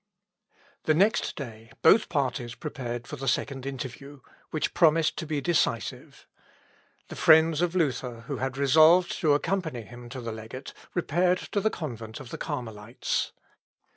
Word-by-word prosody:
The 155 Hz, -, +3 dB
next 200 Hz, +7 st, +2 dB
day 115 Hz, -5 st, -8 dB
both 215 Hz, -, +6 dB
parties 130 Hz, -5 st, -1 dB
prepared 120 Hz, -3 st, -5 dB
for 150 Hz, -, -7 dB
the 135 Hz, 0 st, -5 dB
second 135 Hz, +1 st, -1 dB
interview, 140 Hz, +1 st, -7 dB, 0.3 s
which 155 Hz, -, -2 dB
promised 165 Hz, -1 st, +4 dB
to 165 Hz, -, -4 dB
be 150 Hz, -2 st, -1 dB
decisive. 175 Hz, 0 st, -1 dB, 0.8 s
The -, -, -7 dB
friends 160 Hz, 0 st, +5 dB
of 175 Hz, 0 st, 0 dB
Luther, 130 Hz, -8 st, -1 dB
who 130 Hz, +4 st, -5 dB
had 130 Hz, 0 st, -3 dB
resolved 160 Hz, +7 st, +6 dB
to 150 Hz, -4 st, +4 dB
accompany 160 Hz, -, -2 dB
him 120 Hz, +2 st, -11 dB
to 130 Hz, +1 st, -7 dB
the 115 Hz, -2 st, -5 dB
legate, 110 Hz, +4 st, -8 dB, 0.2 s
repaired 175 Hz, +1 st, +2 dB
to 205 Hz, -, +1 dB
the 220 Hz, -, +2 dB
convent 115 Hz, -, -6 dB
of 130 Hz, -3 st, -10 dB
the -, -, -6 dB
Carmelites. 120 Hz, -6 st, -3 dB
140 Hz, 150 wpm, -27 LUFS, 120-160 Hz, 0.8 s, both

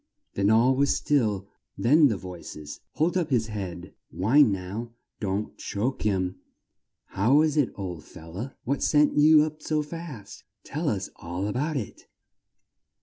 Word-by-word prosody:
Then 100 Hz, +1 st, +1 dB
all 120 Hz, +4 st, +4 dB
was 140 Hz, +2 st, +2 dB
still, 105 Hz, -9 st, 0 dB, 0.3 s
then 145 Hz, +9 st, +5 dB
the 110 Hz, -6 st, -1 dB
voices 85 Hz, -5 st, -9 dB
"Hold 165 Hz, +4 st, +1 dB
up 180 Hz, -3 st, 0 dB
his 120 Hz, -5 st, +2 dB
head 95 Hz, -4 st, -6 dB, 0.2 s
Wine 120 Hz, +6 st, +4 dB
now 100 Hz, +5 st, -5 dB, 0.3 s
Don't 100 Hz, +1 st, -2 dB
choke 120 Hz, +6 st, -2 dB
him 95 Hz, -3 st, 0 dB, 0.7 s
How 110 Hz, +8 st, +2 dB
was 155 Hz, 0 st, +4 dB
it, 145 Hz, -5 st, +2 dB
old 90 Hz, -6 st, -6 dB
fel 80 Hz, +1 st, -13 dB
low? 110 Hz, +10 st, -5 dB
What 140 Hz, +2 st, -1 dB
sent 150 Hz, -1 st, +3 dB
you 150 Hz, +1 st, +7 dB
up 155 Hz, 0 st, -5 dB
so 155 Hz, -1 st, 0 dB
fast? 150 Hz, -9 st, -9 dB, 0.2 s
Tell 150 Hz, +2 st, -2 dB
us 95 Hz, -5 st, -3 dB
all 85 Hz, +3 st, -4 dB
a 105 Hz, -, -2 dB
bout 150 Hz, +4 st, -1 dB
it!" 110 Hz, -, -7 dB
115 Hz, 155 wpm, -26 LUFS, 95-150 Hz, 0.7 s, you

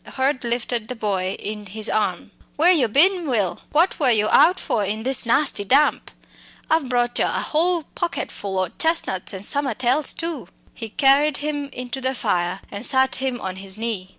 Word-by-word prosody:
Hurd 265 Hz, 0 st, 0 dB
lifted 235 Hz, -1 st, -1 dB
the 250 Hz, -, -5 dB
boy 195 Hz, -4 st, -2 dB
in 210 Hz, 0 st, -7 dB
his 215 Hz, +3 st, -4 dB
arm. 215 Hz, -, -2 dB, 0.2 s
"Where 335 Hz, +4 st, +4 dB
you 295 Hz, -9 st, +3 dB
bin, 340 Hz, -, +3 dB
Will? 210 Hz, -9 st, -1 dB
What 335 Hz, +5 st, +2 dB
were 275 Hz, -4 st, +3 dB
yo 215 Hz, -2 st, +3 dB
out 340 Hz, +6 st, +5 dB
for 215 Hz, -, -1 dB
in 215 Hz, +3 st, -3 dB
this 260 Hz, -1 st, +1 dB
nasty 265 Hz, -4 st, +2 dB
damp? 275 Hz, +9 st, +2 dB, 0.6 s
I've 315 Hz, -5 st, +1 dB
brought 240 Hz, -1 st, 0 dB
yo -, -, +2 dB
a -, -, -2 dB
whole 335 Hz, +2 st, +2 dB
pocket 345 Hz, -1 st, -3 dB
full 195 Hz, -2 st, -5 dB
o' 185 Hz, -2 st, 0 dB
chestnuts, 320 Hz, -, +1 dB
and 195 Hz, 0 st, -4 dB
summat 280 Hz, -1 st, -2 dB
else 260 Hz, +4 st, +2 dB
too." 330 Hz, -, -4 dB, 0.3 s
He 225 Hz, -, -7 dB
carried 280 Hz, +4 st, +3 dB
him 290 Hz, -1 st, -2 dB
in 250 Hz, -1 st, -7 dB
to 265 Hz, -, -4 dB
the 260 Hz, +1 st, -1 dB
fire 180 Hz, -3 st, -1 dB
and 200 Hz, +2 st, -6 dB
sat 265 Hz, 0 st, +2 dB
him 260 Hz, -2 st, -2 dB
on 190 Hz, 0 st, -5 dB
his 190 Hz, +1 st, -7 dB
knees. 220 Hz, -5 st, -4 dB
250 Hz, 195 wpm, -22 LUFS, 210-290 Hz, 0.6 s, out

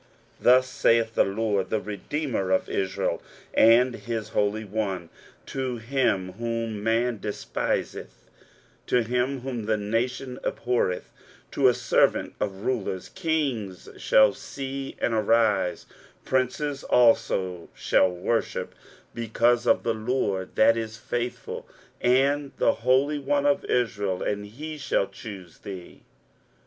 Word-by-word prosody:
23:049:007 -, -, -21 dB
Thus 130 Hz, +1 st, +6 dB
saith 115 Hz, -3 st, +2 dB
the -, -, +4 dB
LORD, 100 Hz, -1 st, -1 dB
the 110 Hz, -, +1 dB
Redeemer 105 Hz, 0 st, -3 dB
of 95 Hz, -, +2 dB
Israel, 95 Hz, -1 st, -1 dB, 0.3 s
and 120 Hz, +3 st, +6 dB
his 115 Hz, -2 st, -4 dB
Holy 105 Hz, +1 st, 0 dB
One, 95 Hz, -5 st, -3 dB, 0.4 s
to 130 Hz, -2 st, -3 dB
him 115 Hz, -6 st, 0 dB
whom 115 Hz, -2 st, -2 dB
man 115 Hz, +1 st, +1 dB
despiseth, 105 Hz, 0 st, -3 dB, 0.6 s
to 125 Hz, -, +3 dB
him 125 Hz, +3 st, -1 dB
whom 125 Hz, -4 st, -4 dB
the 110 Hz, -1 st, +2 dB
nation 125 Hz, +5 st, -2 dB
abhorreth, 120 Hz, -7 st, -1 dB, 0.4 s
to -, -, +3 dB
a -, -, +4 dB
servant -, -, +2 dB
of 100 Hz, 0 st, -3 dB
rulers, 100 Hz, -7 st, -2 dB
Kings 140 Hz, -, -2 dB
shall 110 Hz, -2 st, +5 dB
see 135 Hz, 0 st, -6 dB
and 115 Hz, -, 0 dB
arise, 110 Hz, -4 st, +2 dB, 0.4 s
princes 135 Hz, +2 st, -1 dB
also 95 Hz, -7 st, +2 dB
shall 95 Hz, -, +3 dB
worship, 90 Hz, +6 st, -2 dB, 0.4 s
because 120 Hz, +1 st, +1 dB
of -, -, +4 dB
the 115 Hz, -, +1 dB
LORD 110 Hz, -4 st, -2 dB
that 115 Hz, +1 st, +5 dB
is 110 Hz, -1 st, -4 dB
faithful, 120 Hz, +1 st, -4 dB, 0.3 s
and 140 Hz, +3 st, +2 dB
the -, -, +3 dB
Holy 130 Hz, +5 st, +2 dB
One 145 Hz, 0 st, 0 dB
of 145 Hz, -1 st, +2 dB
Israel, 100 Hz, -6 st, 0 dB
and 105 Hz, 0 st, -2 dB
he 150 Hz, +8 st, -7 dB
shall 115 Hz, -, +1 dB
choose 95 Hz, -5 st, -10 dB
thee. 95 Hz, -3 st, -9 dB
115 Hz, 125 wpm, -26 LUFS, 105-130 Hz, 0.6 s, Thus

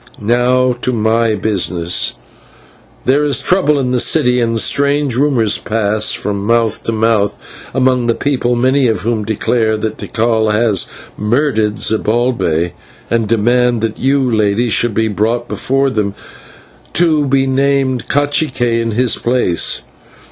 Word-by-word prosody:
Now 125 Hz, +3 st, +2 dB
to 125 Hz, -, -1 dB
my 110 Hz, 0 st, +1 dB
business. 90 Hz, -4 st, -1 dB, 0.9 s
There 140 Hz, +3 st, +2 dB
is 145 Hz, -2 st, +1 dB
trouble 180 Hz, -6 st, +2 dB
in 130 Hz, -2 st, -1 dB
the 125 Hz, -, +1 dB
city, 125 Hz, -3 st, +2 dB
and 115 Hz, -1 st, 0 dB
strange 140 Hz, 0 st, +1 dB
rumours 125 Hz, -6 st, +1 dB
pass 110 Hz, -1 st, 0 dB
from 100 Hz, -1 st, -3 dB
mouth 115 Hz, 0 st, +1 dB
to -, -, 0 dB
mouth 110 Hz, -2 st, +1 dB, 0.3 s
among 130 Hz, -2 st, +1 dB
the 115 Hz, -, +1 dB
people, 125 Hz, -4 st, -1 dB
many 130 Hz, +2 st, +2 dB
of 110 Hz, -5 st, -1 dB
whom 110 Hz, +1 st, -1 dB
declare 110 Hz, +1 st, 0 dB
that 110 Hz, 0 st, -4 dB
Tikal 110 Hz, -1 st, 0 dB
has 105 Hz, -3 st, +1 dB, 0.3 s
murdered 110 Hz, -1 st, 0 dB
Zibalbay, 110 Hz, -7 st, 0 dB, 0.4 s
and 115 Hz, -2 st, +1 dB
demand 120 Hz, +1 st, +2 dB
that 110 Hz, -1 st, -3 dB
you, 135 Hz, +2 st, +2 dB, 0.2 s
Lady, 110 Hz, +3 st, +1 dB
should 110 Hz, +1 st, +1 dB
be 110 Hz, 0 st, +1 dB
brought 115 Hz, +3 st, -1 dB
before 135 Hz, +1 st, -1 dB
them, 105 Hz, -3 st, -2 dB, 0.8 s
that -, -, 0 dB
you 160 Hz, -3 st, +3 dB
may 145 Hz, -, -1 dB
be 135 Hz, 0 st, +2 dB
named 135 Hz, -2 st, 0 dB
/cacique/ 145 Hz, 0 st, 0 dB, 0.2 s
in 115 Hz, -1 st, -2 dB
his 125 Hz, +1 st, +1 dB
place. 120 Hz, -9 st, 0 dB
120 Hz, 145 wpm, -15 LUFS, 110-130 Hz, 0.9 s, you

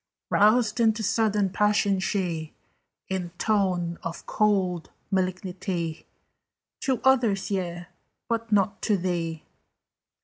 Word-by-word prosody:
Roused 215 Hz, +2 st, +4 dB
into 220 Hz, -1 st, +3 dB
sudden 210 Hz, -2 st, +1 dB
passion, 205 Hz, -1 st, +2 dB
she 175 Hz, -5 st, -2 dB, 0.5 s
In 185 Hz, -2 st, -3 dB
tone 185 Hz, -5 st, 0 dB
of 165 Hz, 0 st, -6 dB
cold 190 Hz, -5 st, +1 dB, 0.2 s
malignity: 185 Hz, -3 st, -2 dB, 0.7 s
"To 265 Hz, -4 st, 0 dB
others, 235 Hz, -8 st, +3 dB
yea: 175 Hz, -2 st, -2 dB, 0.4 s
but 230 Hz, -1 st, -2 dB
not 200 Hz, 0 st, +2 dB
to 210 Hz, -3 st, +2 dB
thee." 170 Hz, -3 st, -2 dB
195 Hz, 100 wpm, -26 LUFS, 175-215 Hz, 0.7 s, Roused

